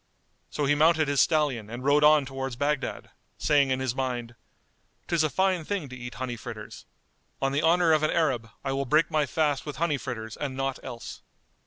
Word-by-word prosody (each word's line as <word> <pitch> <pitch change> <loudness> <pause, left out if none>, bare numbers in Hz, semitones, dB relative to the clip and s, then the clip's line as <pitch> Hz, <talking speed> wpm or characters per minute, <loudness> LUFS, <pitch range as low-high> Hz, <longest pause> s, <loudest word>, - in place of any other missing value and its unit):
So 145 - -2
he 145 - +3
mounted 155 +1 +4
his 140 -1 +3
stallion 140 -9 +1
and 120 +2 -7
rode 145 +2 +4
on 150 -1 +6
towards 135 -1 -5
Baghdad, 145 +2 -2 0.3
saying 145 -2 +3
in 130 0 0
his 130 -2 -1
mind, 125 -3 -3 0.7
"'Tis 170 -2 +2
a 155 - +2
fine 190 0 +1
thing 180 -5 -3
to 130 - -8
eat 120 -1 -8
honey 130 -2 -4
fritters! 110 -2 -9 0.5
On 135 0 0
the 140 +2 +1
honour 165 +1 +4
of 155 -1 +4
an 155 - +2
Arab, 130 -9 0
I 135 - -2
will 135 0 -1
break 155 +4 +2
my 150 -2 +1
fast 150 -1 0
with 150 -2 -6
honey 150 -1 0
fritters 110 -4 -6
and 135 -3 -4
naught 135 0 -2
else!" 115 - -8
140 Hz, 200 wpm, -27 LUFS, 130-155 Hz, 0.7 s, on